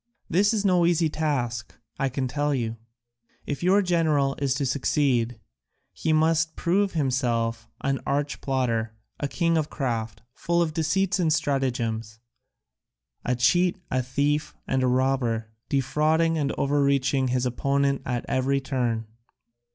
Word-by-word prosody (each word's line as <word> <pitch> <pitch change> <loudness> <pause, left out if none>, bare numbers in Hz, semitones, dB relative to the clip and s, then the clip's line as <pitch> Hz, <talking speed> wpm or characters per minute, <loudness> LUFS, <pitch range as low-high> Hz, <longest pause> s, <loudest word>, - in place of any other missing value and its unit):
This 200 +5 +3
is 210 -3 0
no 180 -3 +4
easy 170 -2 +2
task, 125 -8 -2 0.2
I 135 - +1
can 130 0 -2
tell 145 +3 0
you. 115 -2 -2 0.7
If 145 - -4
your 190 +3 +4
general 155 -6 +2
is 135 -2 +1
to 140 0 -1
succeed 125 -3 +1 0.5
he 160 - -1
must 160 +1 +2
prove 195 +3 +1
himself 120 -6 0
an 135 -1 0
arch 145 +2 -2
plotter, 115 -5 -1 0.2
a 145 - -1
king 165 +2 +1
of 155 - -2
craft, 115 -6 -3
full 170 0 0
of 165 -2 +1
deceits 180 +5 +1
and 165 -3 +2
stratagems, 120 -7 -1 1.1
a 125 - 0
cheat, 175 +9 +3
a 130 - +1
thief, 140 +4 -1
and 130 - +1
a 130 - +2
robber, 125 -4 0 0.2
defrauding 155 +5 +2
and 145 -3 0
overreaching 140 -1 +1
his 125 0 0
opponent 140 +2 0
at 125 -2 -3
every 135 +1 +1
turn." 125 -4 -1
140 Hz, 140 wpm, -25 LUFS, 125-155 Hz, 1.1 s, no